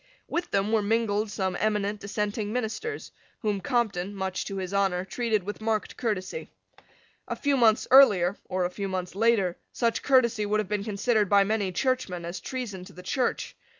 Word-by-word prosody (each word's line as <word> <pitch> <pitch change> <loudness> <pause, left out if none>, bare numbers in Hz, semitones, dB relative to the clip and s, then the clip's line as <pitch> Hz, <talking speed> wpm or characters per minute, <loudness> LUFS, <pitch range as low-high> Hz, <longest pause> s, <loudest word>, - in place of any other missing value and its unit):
With 345 0 -2
them 200 +2 0
were 220 -1 +3
mingled 210 0 +1
some 190 -2 -2
eminent 210 -1 0
dissenting 210 +1 -2
ministers, 250 - -3 0.3
whom 210 -3 -1
Compton, 205 -4 -1
much 190 -1 -3
to 195 - -5
his 190 0 -4
honour, 190 -2 +1
treated 220 -1 0
with 205 +3 -6
marked 220 -1 -1
courtesy. 220 - -3 0.8
A - - -2
few 285 -1 +1
months 230 -4 +4
earlier, 200 -9 +7
or 185 -1 0
a 175 - -2
few 200 +2 -4
months 185 -1 -3
later, 200 -4 +2
such 230 -1 0
courtesy 245 -5 +3
would 210 +1 +1
have 210 - -1
been 205 0 -1
considered 210 0 +1
by 200 -1 +6
many 205 -2 0
Churchmen 195 -6 -1
as 175 +2 -5
treason 230 -8 -5
to 195 - -13
the 180 - -11
Church. 250 +7 -1
210 Hz, 180 wpm, -27 LUFS, 190-230 Hz, 0.8 s, earlier